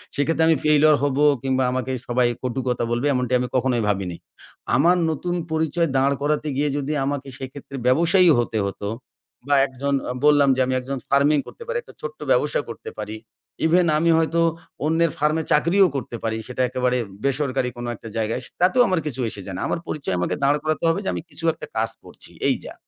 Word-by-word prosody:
সেক্ষেত্রে 160 +3 +1
আমি 165 - +5
ফেইলিউর 150 0 +5
হব 140 -2 0 0.3
কিংবা 130 -1 +1
আমাকে 130 0 -2 0.2
সবাই 125 0 +2 0.2
কটু 130 0 -2
কথা 125 -1 0
বলবে 120 +4 0
এমন 125 -1 0 0.3
কখনোই 125 -2 +1
ভাবিনি। 95 -4 -1 0.6
আমার 175 +5 +4
নতুন 175 +3 -2 0.2
পরিচয় 160 +1 +1
দাঁড় 135 +1 +3
করাতে 150 +1 0
গিয়ে 145 +1 +1
যদি 145 +1 -2
আমাকে 140 -1 -3
সেক্ষেত্রে 135 +1 -9
ব্যবসায়ী 170 +7 +4
হতে 115 -2 -1
হত, 100 - -5 0.7
বা 145 - +4
একজন 140 +1 -3 0.2
আ - - -2
বললাম 145 -2 +5
যে 130 - +1
আমি 130 - -1
একজন 135 +2 -4
ফার্মিং 140 +2 +4
করতে 470 - -10
পারি, 485 +1 -2
একটা - - -16
ছোট্ট 475 0 -7
ব্যবসা - - +2
করতে 450 - -7
পারি। 110 - -5 0.5
ইভেন 175 +2 +4
আমি 170 +2 +2
হয়তো 165 +1 +1 0.4
অন্যের 165 +1 +2
ফার্মে 150 +2 +1
চাকরিও 175 +6 +4
করতে 120 -3 -4
পারি। 110 0 -1
সেটা 125 +1 -3
একেবারে 125 0 0 0.3
বেসরকারি 135 -2 0
কোনো 120 0 -5
একটা 115 - -11
জায়গায়, 110 0 -1
স - - -6
তাতেও 190 +8 +4
আমার 185 -3 +1
কিছু 135 -4 -4
এসে 100 - -8
যায় 95 - -6
না। - - -4
আমার - - -1
পরিচয় 140 -11 -3
আমাকে 90 - -1
দাঁড় 140 +2 +4
করাতে 155 +1 -1
হবে 165 - +1
যে, - - -2
আমি - - -3
কিছু 155 +3 -8
একটা - - -9
কাজ 115 +1 +1
করছি, - - -11 0.2
এই - - +3
যা। - - -8
140 Hz, 195 wpm, -22 LUFS, 125-160 Hz, 0.7 s, আমি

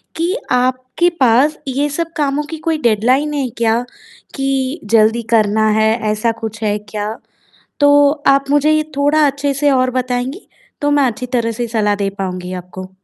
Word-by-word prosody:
कि 335 +3 -1 0.2
आपके 255 +6 +1
पास 260 +4 +3
ये 280 +3 -1
सब 330 +3 -3
कामों 290 0 0
की 320 - -5
कोई 325 -1 +2
डेडलाइन 250 +6 +2
है 280 -3 -1
क्या, 230 0 +1 0.5
कि 270 +2 -1 0.2
जल्दी 225 +2 +3
करना 215 0 +3
है, 220 0 +3 0.2
ऐसा 215 +2 0
कुछ 220 0 -6
है 210 -1 0
क्या? 210 +1 -5 0.6
तो 285 0 +5 0.2
आप 275 0 +4
मुझे 290 +1 +3
ये 310 0 +2
थोड़ा 295 +2 +3
अच्छे 280 0 -1
से 285 +1 +1
और 255 -1 +2
बताएँगी, 255 - -3 0.3
तो 290 0 +1
मैं 290 -1 +3
अच्छी 245 +2 -4
तरह 230 -2 +1
से 235 +2 -3
सलाह 215 -3 0
दे 200 -1 -1
पाऊँगी 185 -1 -4
आपको। 185 +1 -8
255 Hz, 170 wpm, -16 LUFS, 220-285 Hz, 0.6 s, तो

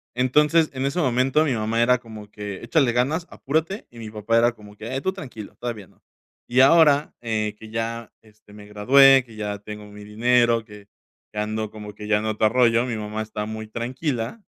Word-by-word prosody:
Entonces, 150 +6 +3
en 130 0 -3
ese 140 +6 -1
momento 130 +2 +2
mi 140 - 0
mamá 110 +1 0
era 125 +1 +4
como 110 -3 -12
que: 105 -2 -7
"Échale 140 -7 +2
ganas. 140 +8 0
Apúrate", 160 +8 -2
y 120 - -14
mi 110 - -7
papá 110 +2 0
era 120 +1 +4
como 105 -2 -15
que: 115 +6 -5
"Tú 190 +7 -2
tranquilo, 125 - -9
todavía 115 -5 -6
no". - - -29 0.5
Y 125 - +2
ahora, 150 +1 +5
eh, 110 -2 -2
que 110 - -12
ya 115 0 -4
este 110 -1 -22
me 105 0 -12
gradué, 130 +6 +6
que 115 -3 -15
ya 105 -1 -4
tengo 105 0 -9
mi 105 0 -12
dinero, 120 +2 +2
que 105 -2 -14 0.5
que 105 - -4
ando 110 0 -2
como 105 -1 -9
que 105 0 -9
ya 105 0 +3
en 110 - -5
otro 110 0 +1
rollo. 120 -1 +3
Mi 125 -3 -3
mamá 105 0 -4
está 105 -1 -5
muy 110 0 -6
tranquila. 125 - -4
115 Hz, 200 wpm, -23 LUFS, 105-130 Hz, 0.5 s, gradué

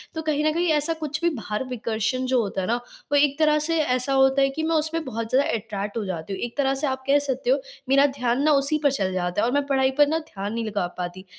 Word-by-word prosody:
तो 320 - -2
कहीं 305 -1 0
ना 310 - +3
कहीं 340 +3 0
ऐसा 300 +2 +1
कुछ 310 -1 -4
भी 340 - +3
बाहर 215 -1 -3
विकर्षण 235 +1 -2
जो 255 0 +2
होता 195 -3 -3
है 185 - -3
ना 235 - +2 0.4
वो 290 - +3
एक 285 0 +3
तरह 300 -1 +4
से 330 +2 0
ऐसा 255 -1 0
होता 265 0 +4
है 275 - +4
कि, 310 +4 -4
मैं 325 +1 +1
उस 310 0 +1
पे 330 +1 -2
बहुत 230 -2 -4
ज़्यादा 270 +4 +3
अट्रैक्ट 210 -1 -4
हो 220 - -2
जाती 185 0 -5
हूँ। - - -5
एक 240 +2 -5
तरह 270 -1 +2
से 275 +2 -1
आप 265 0 -3
कह 285 +1 +5
सकते 280 - -3
हो - - +3 0.3
मेरा 275 +1 +5
ध्यान 250 0 0
ना 310 - +4
उसी 280 +1 +2
पर 285 - +4
चल 190 -8 -1
जाता 180 +1 -1
है - - +2
और 245 - -1
मैं 285 0 +1
पढ़ाई 265 -1 +2
पर 290 0 +6
ना 315 +2 +1
ध्यान 210 -9 -6
नहीं 230 -1 -2
लगा 200 -4 -1
पाती। 180 +1 -5
265 Hz, 285 wpm, -24 LUFS, 220-295 Hz, 0.4 s, पर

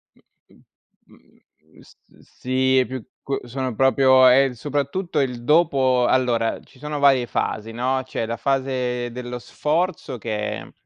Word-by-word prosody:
Mhmm, - - -28 0.5
mhmm, 80 0 -25
s - - -20 0.4
sì, 130 +1 +1
è 130 - +2
più 130 -2 -6 0.2
c 135 -3 -4
sono 130 0 -3
proprio 130 0 +5
è 135 +1 +5
soprattutto 145 +6 -2
il 125 -3 -2
dopo 135 -5 +3
allora, 120 -3 +1
ci 135 - -22
sono 150 0 -4
varie 135 -3 +4
fasi, 110 -1 -3
no, 130 +3 -1
c'è 115 -3 -3
la 115 0 -4
fase 125 -2 -1
dello 125 0 -6
sforzo 155 -1 -2
che 105 -1 -3
è - - -12
130 Hz, 145 wpm, -22 LUFS, 120-135 Hz, 0.5 s, proprio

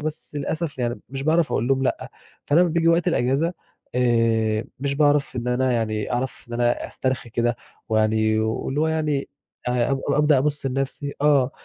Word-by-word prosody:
بس 155 0 -4
للأسف 150 0 -3
يعني 120 0 -2
مش 135 +1 -5
باعرف 160 +2 +2
اقول 120 +4 0
لهم 135 0 +2
لأ، - - -2 0.4
فأنا 150 +4 +4
أما 180 - +4
بييجي 165 0 +2
وقت 170 +2 +3
الأجازة، 145 +3 +1 0.4
آآ 115 -3 +2 0.2
مش 140 0 -1
باعرف 145 -2 +2
إن 125 0 -2
أنا 130 +1 +1
يعني 110 -2 -1
أعرف 130 +2 -3
إن - - -10
أنا 120 0 +1
أسترخي 130 -2 -3
كده 120 +1 0 0.3
ويعني 110 0 +2
واللي 110 +6 -1
هو 160 - +2
يعني 155 -3 -1 0.4
أ 125 +1 +1
أب 135 - 0
أبدأ 150 -2 +4
أبُص 145 0 -1
لنفسي 135 +2 -3
آه، 140 -3 +4
135 Hz, 175 wpm, -23 LUFS, 120-150 Hz, 0.4 s, فأنا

